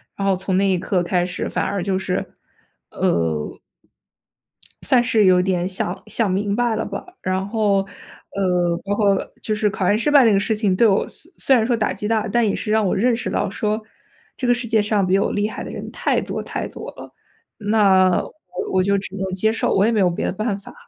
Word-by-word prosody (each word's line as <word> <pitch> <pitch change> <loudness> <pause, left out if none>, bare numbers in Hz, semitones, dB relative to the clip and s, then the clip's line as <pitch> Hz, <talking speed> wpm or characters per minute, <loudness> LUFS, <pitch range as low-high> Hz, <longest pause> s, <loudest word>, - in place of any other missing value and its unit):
然 195 - -2
后 195 - +3
从 190 0 -1
那 195 +1 +3
一 185 -2 +1
刻 180 0 0
开 175 0 +1
始 180 0 -4
反 - - -1
而 195 -3 -2
就 190 -1 0
是 185 -1 -3 0.6
呃 80 -3 -1 1.2
算 245 -2 +3
是 225 -4 +3
有 180 -1 +5
点 180 -1 0
想 185 -1 -1
想 225 -4 0
明 200 +2 0
白 240 -1 +1
了 - - -2
吧， 200 -1 -6 0.2
然 185 +1 -1
后， 205 -3 +1 0.5
呃， 180 -3 +1
包 205 +1 0
括 200 -2 +3 0.2
就 215 - -2
是 210 0 +1
考 195 -1 -3
研 205 - +3
失 295 - +1
败 290 -2 +7
这 225 - +5
个 195 - +3
事 215 +2 0
情 210 -3 +1
对 230 +4 +5
我 195 0 +2
虽 335 - -8
虽 265 - +3
然 225 -2 +2
说 245 - +2
打 220 -2 0
击 210 - -4
大， 220 -1 +1
但 235 +2 +2
也 200 - 0
是 210 - -3
让 220 -1 +3
我 190 - +1
认 240 +5 +2
识 235 - -4
到 195 - -1
说 215 +2 -2 0.6
这 255 - -2
个 245 - +5
世 240 0 -3
界 220 -1 +3
上 205 -2 +1
比 190 +2 +2
我 - - 0
厉 210 +1 0
害 - - -6
的 - - -7
人 - - -7
太 - - 0
多 - - -4
太 - - -4
多 - - -9
了。 - - -12 0.4
那 195 -4 +3
我 - - -10 0.4
我 185 - +4
就 200 +1 +2
只 190 -1 -6
能 195 - -2
接 220 +4 +2
受， 225 - 0
我 195 - +3
也 230 - +2
没 220 - +1
有 185 - +4
别 170 - -3
的 - - 0
办 210 +1 -2
法。 200 - -13
200 Hz, 255 characters per minute, -21 LUFS, 185-220 Hz, 1.2 s, 败